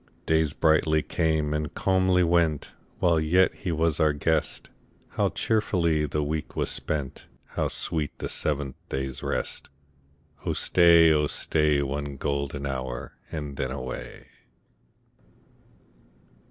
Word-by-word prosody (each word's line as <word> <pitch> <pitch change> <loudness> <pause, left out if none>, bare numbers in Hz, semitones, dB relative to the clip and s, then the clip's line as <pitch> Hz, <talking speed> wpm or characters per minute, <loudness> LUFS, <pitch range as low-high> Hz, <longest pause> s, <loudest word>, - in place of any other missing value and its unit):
Days 80 -2 +2
brightly 80 -1 +3
came 80 -3 0
and 75 -1 -3
calmly 95 -1 +3
went, 85 -3 +1 0.3
While 85 -2 +3
yet 90 +4 +3
he 90 - -4
was 80 -1 +1
our 75 -1 +3
guest; 80 +2 -1 0.4
How - - 0
cheerfully 85 -8 +1
the 75 +2 -1
week 75 +1 -4
was - - -1
spent! 70 -4 -4 0.2
How - - -1
sweet 75 -3 -2
the - - -4
seventh 70 -3 -2
day's 65 -1 -4
rest! - - -3 0.7
Oh - - -1
stay, 85 -2 +5
oh 75 -1 +2
stay. 75 -1 +1
One 70 0 -4
golden 70 0 -2
hour, 65 -2 -4 0.2
and 75 -3 -5
then 65 -1 -2
away. 65 -1 -6
75 Hz, 125 wpm, -26 LUFS, 70-80 Hz, 0.7 s, stay